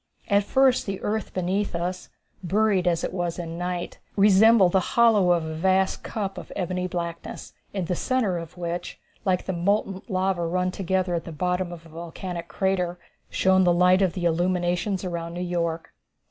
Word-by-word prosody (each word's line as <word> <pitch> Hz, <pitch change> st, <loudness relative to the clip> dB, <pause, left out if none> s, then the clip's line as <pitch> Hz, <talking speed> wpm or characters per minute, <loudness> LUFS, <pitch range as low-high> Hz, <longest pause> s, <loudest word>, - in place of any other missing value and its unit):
At 200 Hz, -1 st, +4 dB
first 265 Hz, -1 st, +3 dB
the 195 Hz, -1 st, -3 dB
earth 215 Hz, 0 st, -2 dB
beneath 185 Hz, +1 st, -1 dB
us, 180 Hz, +2 st, -3 dB, 0.3 s
buried 195 Hz, 0 st, +2 dB
as 170 Hz, -2 st, +1 dB
it -, -, -2 dB
was 175 Hz, -2 st, -2 dB
in 170 Hz, -1 st, -5 dB
night, 180 Hz, 0 st, -4 dB, 0.2 s
resembled 200 Hz, -1 st, +6 dB
the 190 Hz, -, +4 dB, 0.2 s
hollow 215 Hz, -6 st, +5 dB
of 170 Hz, -2 st, +2 dB
a 160 Hz, -, -4 dB
vast 190 Hz, +3 st, +1 dB
cup 195 Hz, -3 st, -4 dB
of -, -, -11 dB
ebony 180 Hz, -1 st, -2 dB
blackness, 170 Hz, -2 st, -5 dB, 0.2 s
in 190 Hz, -3 st, -2 dB
the 180 Hz, -, -1 dB
centre 215 Hz, -6 st, 0 dB
of 165 Hz, +2 st, -10 dB
which, 175 Hz, 0 st, -4 dB, 0.3 s
like 185 Hz, -2 st, +1 dB
the 190 Hz, -, -2 dB
molten 195 Hz, +2 st, 0 dB
lava 185 Hz, -3 st, 0 dB
run 180 Hz, +2 st, 0 dB
together 185 Hz, -1 st, -1 dB
at 170 Hz, -1 st, -2 dB
the 165 Hz, -, -7 dB
bottom 180 Hz, +2 st, -1 dB
of 170 Hz, -1 st, -10 dB
a -, -, -14 dB
volcanic 170 Hz, +2 st, -6 dB
crater, 185 Hz, -3 st, -1 dB, 0.3 s
shone 190 Hz, 0 st, +3 dB
the 175 Hz, -, +4 dB
light 180 Hz, +2 st, +4 dB
of 185 Hz, -4 st, +2 dB
the 180 Hz, -2 st, -3 dB
illuminations 175 Hz, +2 st, 0 dB
around 170 Hz, -1 st, -4 dB
New -, -, -4 dB
York. 170 Hz, -2 st, -2 dB
180 Hz, 180 wpm, -25 LUFS, 175-190 Hz, 0.3 s, resembled